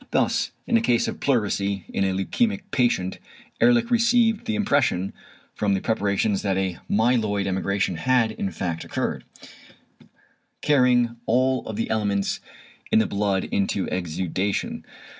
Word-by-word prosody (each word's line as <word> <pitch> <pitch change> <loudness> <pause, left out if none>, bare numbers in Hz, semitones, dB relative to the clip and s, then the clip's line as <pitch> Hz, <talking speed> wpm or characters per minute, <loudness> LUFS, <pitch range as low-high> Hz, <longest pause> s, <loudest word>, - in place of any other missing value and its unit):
Thus - - +1 0.2
in 235 - +3
a - - +1
case 120 - +2
of - - -5
pleurisy 100 -7 0
in - - -1
a 95 - +1
leukæmic 205 - 0
patient, 120 -9 +1 0.4
Ehrlich 120 - +4
received 235 -1 +3
the 220 - 0
impression 140 - +1 0.4
from 100 -2 0
the - - 0
preparations 100 -2 0
that 95 -2 0
a 95 -3 -2
"myeloid" 110 -2 +2
emigration 95 -1 -1
had 125 +2 +2
in 100 -2 -3
fact 85 -4 -4
occurred, - - -3 1.4
carrying 125 -5 +3
all 130 0 +1
the 110 +1 -2
elements 100 -3 0 0.5
in - - +5
the 110 - +4
blood 100 -1 0
into 100 -1 -1
the - - -5
exudation. 95 +3 -2
105 Hz, 140 wpm, -24 LUFS, 95-130 Hz, 1.4 s, in